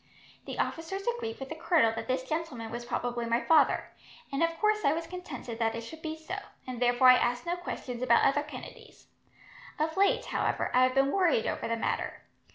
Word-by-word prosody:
The -, -, -6 dB
officers 385 Hz, +5 st, -3 dB
agreed 470 Hz, -1 st, -2 dB
with 270 Hz, 0 st, -6 dB
the 320 Hz, -, -5 dB
colonel 320 Hz, -8 st, +3 dB
that -, -, -5 dB
this 255 Hz, 0 st, 0 dB
gentleman 290 Hz, -8 st, -3 dB
was 240 Hz, +1 st, -5 dB
probably 240 Hz, -1 st, -2 dB
my 230 Hz, +1 st, +2 dB
father, 315 Hz, +3 st, +3 dB, 0.4 s
and 275 Hz, -, 0 dB
of 330 Hz, 0 st, +1 dB
course 425 Hz, 0 st, +2 dB
I 280 Hz, -, +4 dB
was 330 Hz, +1 st, -3 dB
contented 310 Hz, -10 st, -7 dB
that 225 Hz, -1 st, +1 dB
it 230 Hz, -, -4 dB
should 315 Hz, +8 st, -10 dB
be 315 Hz, -1 st, -4 dB
supposed 365 Hz, +5 st, -5 dB
so, -, -, -15 dB, 0.2 s
and 250 Hz, -2 st, -6 dB
therefore 245 Hz, +1 st, +5 dB
I 255 Hz, -, +9 dB
asked 245 Hz, +5 st, 0 dB
no 345 Hz, +1 st, 0 dB
questions 255 Hz, -8 st, -6 dB
about 235 Hz, -2 st, +4 dB
other 285 Hz, +2 st, +3 dB
Kennedys. 300 Hz, 0 st, -11 dB, 0.7 s
Of 315 Hz, +1 st, -1 dB
late, 400 Hz, +1 st, +3 dB
however, -, -, -1 dB
I 250 Hz, -, +5 dB
have 255 Hz, 0 st, -1 dB
been 270 Hz, +1 st, +3 dB
worried 355 Hz, -, +2 dB
over -, -, -2 dB
the 230 Hz, 0 st, -1 dB
matter. -, -, -2 dB
280 Hz, 210 wpm, -29 LUFS, 245-330 Hz, 0.7 s, I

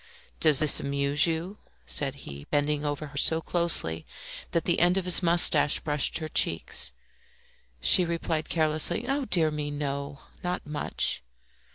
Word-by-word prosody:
"Does 155 Hz, -3 st, +4 dB
this 155 Hz, -1 st, +6 dB
amuse 140 Hz, +2 st, 0 dB
you?" 170 Hz, +5 st, -4 dB, 0.3 s
said 140 Hz, -3 st, -2 dB
he, 70 Hz, 0 st, -10 dB
bending 145 Hz, 0 st, -1 dB
over 145 Hz, +1 st, -4 dB
her 145 Hz, -1 st, -11 dB
so 160 Hz, +3 st, +4 dB
closely 165 Hz, -, +1 dB, 0.5 s
that 170 Hz, -, -2 dB
the 175 Hz, -, 0 dB
end 175 Hz, +2 st, +2 dB
of 190 Hz, -, -2 dB
his 180 Hz, +1 st, +5 dB
moustache 165 Hz, -4 st, +3 dB
brushed 150 Hz, -3 st, 0 dB
her 155 Hz, -, -5 dB
cheek. -, -, 0 dB, 1.1 s
She 185 Hz, -, +5 dB
replied 165 Hz, -2 st, -3 dB
carelessly 155 Hz, +5 st, +1 dB
"Oh, 275 Hz, +1 st, -2 dB
dear 165 Hz, -7 st, +1 dB
me, 150 Hz, -1 st, -5 dB
no, 140 Hz, -1 st, -6 dB, 0.2 s
not 180 Hz, 0 st, -4 dB
much." 150 Hz, -, -3 dB
155 Hz, 150 wpm, -26 LUFS, 145-170 Hz, 1.1 s, this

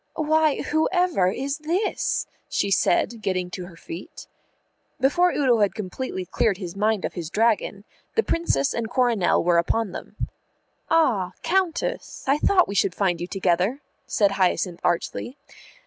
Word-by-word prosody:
"Why, 315 Hz, -1 st, +2 dB
whoever 315 Hz, -, +2 dB
is 275 Hz, +8 st, -3 dB
this?" 345 Hz, +7 st, -1 dB, 0.2 s
she 200 Hz, -, 0 dB
said, 220 Hz, +4 st, +2 dB
getting 185 Hz, -3 st, -1 dB
to 180 Hz, -2 st, -6 dB
her 175 Hz, -, -13 dB
feet. 165 Hz, +2 st, -9 dB, 0.7 s
Before 345 Hz, +8 st, +3 dB
Udo 255 Hz, -5 st, +2 dB
had 205 Hz, -2 st, +2 dB
completely 195 Hz, -1 st, -4 dB
cleared 205 Hz, +2 st, +1 dB
his 180 Hz, -3 st, -7 dB
mind 210 Hz, 0 st, +1 dB
of -, -, -4 dB
his 170 Hz, -4 st, -5 dB
dragon, 210 Hz, 0 st, +1 dB, 0.3 s
the 450 Hz, -, +3 dB
Princess 235 Hz, -, 0 dB
and 230 Hz, -1 st, -3 dB
Coronel 240 Hz, -7 st, +2 dB
were 170 Hz, 0 st, +4 dB
upon 215 Hz, +4 st, 0 dB
them. -, -, -9 dB, 0.7 s
"Ah, 245 Hz, -, +2 dB
Countess, 380 Hz, +7 st, -1 dB
I 275 Hz, +2 st, +2 dB
thought 365 Hz, +1 st, +4 dB
we -, -, -4 dB
should 185 Hz, -2 st, +1 dB
find 180 Hz, -4 st, 0 dB
you 175 Hz, -, -3 dB
together," 190 Hz, +6 st, 0 dB, 0.3 s
said 200 Hz, -2 st, +2 dB
Hyacinth 185 Hz, -2 st, 0 dB
archly. 240 Hz, +9 st, -1 dB
215 Hz, 145 wpm, -24 LUFS, 185-295 Hz, 0.7 s, were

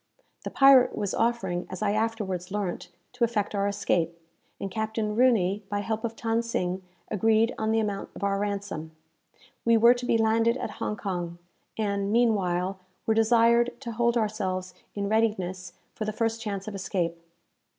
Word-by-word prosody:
The -, -, -4 dB
pirate 270 Hz, -2 st, +6 dB
was 200 Hz, -2 st, -2 dB
offering, 195 Hz, -7 st, 0 dB
as 185 Hz, +3 st, -5 dB
I 205 Hz, -, +2 dB
afterwards 210 Hz, -5 st, -2 dB
learnt, 200 Hz, -3 st, -3 dB, 0.2 s
to 250 Hz, -1 st, -1 dB
effect 220 Hz, -4 st, 0 dB
our 200 Hz, 0 st, +1 dB
escape; 170 Hz, -4 st, 0 dB, 0.4 s
and 195 Hz, -, -4 dB
Captain 220 Hz, 0 st, -2 dB
Rooney, 215 Hz, -5 st, +3 dB
by 205 Hz, 0 st, -1 dB
help 220 Hz, +1 st, -3 dB
of 230 Hz, -1 st, -3 dB
Than 225 Hz, 0 st, 0 dB
Sing, 190 Hz, -5 st, -2 dB, 0.3 s
agreed 220 Hz, +2 st, +3 dB
on 220 Hz, 0 st, 0 dB
the 225 Hz, -, +3 dB
amount 205 Hz, -2 st, -2 dB
of -, -, -8 dB
our 195 Hz, 0 st, +1 dB
ransom. 200 Hz, -6 st, -4 dB, 0.7 s
We 230 Hz, 0 st, +4 dB
were 235 Hz, +2 st, +7 dB
to 245 Hz, 0 st, -5 dB
be 230 Hz, -, +3 dB
landed 225 Hz, +2 st, +2 dB
at 220 Hz, -, -4 dB
Hong 210 Hz, -, -2 dB
Kong, 175 Hz, -4 st, -4 dB, 0.4 s
and, 200 Hz, -2 st, -1 dB
meanwhile, 195 Hz, -5 st, +1 dB, 0.3 s
were 220 Hz, -, +3 dB
desired 235 Hz, +2 st, +3 dB
to 240 Hz, -3 st, -5 dB
hold 235 Hz, +1 st, +1 dB
ourselves 190 Hz, -4 st, -2 dB, 0.2 s
in 200 Hz, -1 st, -2 dB
readiness 190 Hz, -5 st, 0 dB, 0.2 s
for 215 Hz, -, -4 dB
the 215 Hz, -, -2 dB
first 225 Hz, +1 st, -1 dB
chance 200 Hz, -3 st, -4 dB
of 215 Hz, -, -5 dB
escape. 175 Hz, -3 st, -2 dB
210 Hz, 170 wpm, -27 LUFS, 190-225 Hz, 0.7 s, were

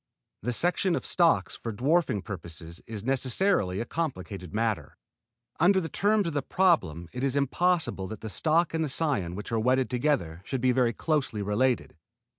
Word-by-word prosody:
The 125 Hz, -, -1 dB
selection 175 Hz, +6 st, +1 dB
of -, -, -3 dB
stocks 170 Hz, -2 st, +2 dB
for 115 Hz, -, -5 dB
dwarfing 130 Hz, -, +1 dB
purposes 85 Hz, -3 st, -8 dB
is 110 Hz, -3 st, -6 dB
necessarily 130 Hz, -, +1 dB
a 115 Hz, -, -2 dB
complicated 95 Hz, -, -4 dB
matter. 105 Hz, -9 st, -2 dB, 0.6 s
Under 190 Hz, +3 st, +5 dB
the 165 Hz, -3 st, -4 dB
terms 205 Hz, +5 st, +2 dB
of 165 Hz, -, -2 dB
the 145 Hz, -, 0 dB
problem 95 Hz, -, +1 dB
it 125 Hz, +1 st, -4 dB
is 135 Hz, -1 st, +1 dB
impossible 145 Hz, -, +1 dB
that 110 Hz, +1 st, -8 dB
the 110 Hz, -, -5 dB
stock 160 Hz, +9 st, +1 dB
and 160 Hz, 0 st, 0 dB
the 155 Hz, -, -2 dB
cion 130 Hz, -, 0 dB
which 105 Hz, +3 st, -7 dB
are 115 Hz, -, +1 dB
wedded 130 Hz, +3 st, +2 dB
together 120 Hz, -, 0 dB
should 135 Hz, +5 st, -3 dB
be 130 Hz, +1 st, +3 dB
very 125 Hz, -2 st, +2 dB
closely 135 Hz, -10 st, -1 dB
related. 120 Hz, +5 st, 0 dB
125 Hz, 175 wpm, -28 LUFS, 100-160 Hz, 0.6 s, Under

